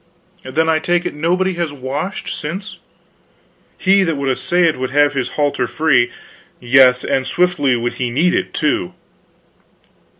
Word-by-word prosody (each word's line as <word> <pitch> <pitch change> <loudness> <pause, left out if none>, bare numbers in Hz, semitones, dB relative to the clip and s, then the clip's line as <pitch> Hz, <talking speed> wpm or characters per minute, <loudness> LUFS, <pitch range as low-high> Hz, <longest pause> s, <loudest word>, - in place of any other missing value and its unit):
"Then 155 +5 -1
I 160 -1 +2
take 175 +2 0
it 180 - -3
nobody 180 +5 0
has 170 -3 -2
washed 145 +7 -5
since." 185 +7 -6 1.0
"He 195 +1 +3
that 165 -4 0
would 140 -1 -1
essay 175 +7 0
it 165 -2 +3
could 130 -2 -4
have 145 +1 +3
his 130 -3 -2
halter 145 -4 0
free; 155 -6 +2 0.5
yes, 125 0 +4
and 130 0 -1
swiftly 175 -7 +1
would 120 0 -2
he 125 - 0
need 160 +9 +1
it, - - -1
too." 145 - -1
150 Hz, 155 wpm, -17 LUFS, 130-175 Hz, 1.0 s, yes